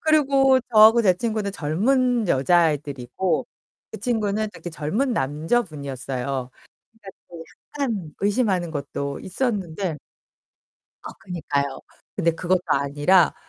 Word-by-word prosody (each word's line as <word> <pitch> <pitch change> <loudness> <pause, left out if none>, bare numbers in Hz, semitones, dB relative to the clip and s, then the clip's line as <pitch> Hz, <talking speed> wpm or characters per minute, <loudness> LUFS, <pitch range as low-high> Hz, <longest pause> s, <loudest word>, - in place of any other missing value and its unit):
그리고 275 -4 +4
저하고 220 +2 +7
제 185 -3 +4
친구는 215 -1 -2
젊은 230 - +1
여자애들이고 145 0 +1 0.4
그 - - -8
친구는 215 -3 -1
그때 175 - -8
젊은 205 - -1
남자분이었어요. 140 - -2 0.6
그러니까 225 -4 -15 0.2
그 170 -1 -9 0.3
약간 215 - -3
의심하는 200 -5 +1
것도 140 -1 -4
있었는데. 190 - -2 1.0
아, - - -7
그니까요. 140 -7 -3 0.4
근데 170 -4 +2
그것도 180 +2 0
아니라 145 +6 +3
185 Hz, 280 characters per minute, -23 LUFS, 150-225 Hz, 1.0 s, 저하고